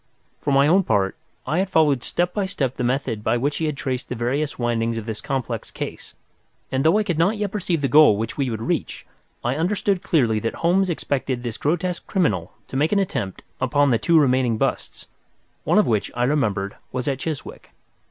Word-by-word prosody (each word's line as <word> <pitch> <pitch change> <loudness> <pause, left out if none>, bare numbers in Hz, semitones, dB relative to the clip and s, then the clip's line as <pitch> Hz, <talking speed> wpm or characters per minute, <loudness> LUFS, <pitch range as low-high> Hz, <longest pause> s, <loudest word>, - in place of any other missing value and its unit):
For - - -3
my 140 +1 +5
own 180 +6 +5
part, 100 - +1 0.3
I 160 - 0
had 190 0 0
followed 150 -7 +3
step 175 0 -1
by 200 -2 -1
step 135 -9 -2
the - - -3
methods 125 -3 -1
by 120 - +1
which 145 +4 -1
he 160 - -1
had 150 -2 -2
traced 130 -1 -3
the 125 - -3
various 135 +6 -1
windings 115 -1 0
of 110 - -5
this 110 -2 -5
complex 135 -3 -3
case, - - -7 0.6
and, 130 +1 0
though 160 +6 +4
I 215 - +2
could 175 -6 -2
not 195 +6 +3
yet 205 -2 -2
perceive 180 -6 -1
the 140 - +1
goal 145 -5 +6
which 115 +1 -3
we 135 -3 -1
would 110 -1 -4
reach, - - -2 0.4
I 125 +3 0
understood 190 +2 0
clearly 120 -9 +2
that 115 +2 -3
Holmes 185 +3 +2
expected 135 -6 -2
this 120 -3 -4
grotesque 175 +3 -1
criminal 105 - 0 0.2
to - - -7
make 150 +3 +2
an 205 - +3
attempt 105 - -2 0.2
upon 140 +2 +2
the 115 - +3
two 165 +8 +3
remaining 130 -5 +2
busts, - - -2 0.6
one - - +3
of - - +5
which, 110 -4 0
I 120 - 0
remembered, 110 -8 0
was 125 +1 -3
at 135 -2 0
Chiswick. 155 -2 -6
135 Hz, 210 wpm, -23 LUFS, 120-165 Hz, 0.6 s, goal